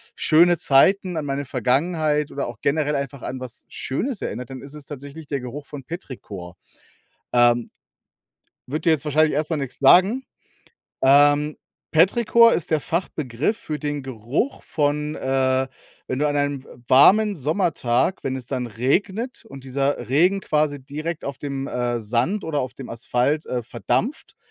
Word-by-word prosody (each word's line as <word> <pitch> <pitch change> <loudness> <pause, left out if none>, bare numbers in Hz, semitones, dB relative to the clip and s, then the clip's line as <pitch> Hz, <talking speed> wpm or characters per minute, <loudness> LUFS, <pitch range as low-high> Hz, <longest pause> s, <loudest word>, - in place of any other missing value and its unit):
schöne 170 +2 +4
Zeiten, 175 +5 +3
an 150 - -2
meine 140 0 -2
Vergangenheit 150 +4 0
oder 140 - -3
auch 120 -2 -8
generell 145 0 +1
einfach 140 -1 -4
an 130 0 -5
was 125 -2 -8
Schönes 220 - -3
erinnert, 125 0 -5
dann 130 -1 -8
ist 140 +2 -8
es 150 -2 -9
tatsächlich 145 +2 -9
der 140 -3 -3
Geruch 140 +4 -7
von 140 -3 -8
Petrichor. 105 - -8 0.8
Ähm, 120 -1 +3 1.0
wird 150 +6 -4
dir 165 - +4
jetzt 155 -2 +2
wahrscheinlich 155 0 +2
erst 155 +2 -1
mal 160 - +1
nix 135 -3 -5
sagen. 190 - +5 0.8
Ähm, 145 +2 +5 0.4
Petrichor 230 +7 +5
ist 165 - -1
der 155 -2 +2
Fachbegriff 155 - -2
für 155 -1 -5
den 145 -2 -3
Geruch 130 - -3
von 150 0 -1
äh, 130 0 +1 0.4
wenn 130 - -2
du 150 - +2
an 145 - -1
einem 145 -2 -1
w - - -18 0.2
warmen 205 +10 +6
Sommertag, 155 -1 0
wenn 130 0 -1
es 125 -3 -8
dann 125 -3 -3
regnet, 190 - -1
und 135 -1 -11
dieser 135 -2 -1
Regen 180 +8 +3
quasi 150 -4 0
direkt 155 +4 -5
auf 140 -2 -5
dem, 140 -1 -4
äh, 120 -1 -1
Sand 120 - 0
oder 150 -3 -1
auf 125 -1 -4
dem 135 - -9
Asphalt, 125 +6 0
äh, 125 -1 -2
verdampft, 120 - -2
145 Hz, 160 wpm, -23 LUFS, 130-160 Hz, 1.0 s, warmen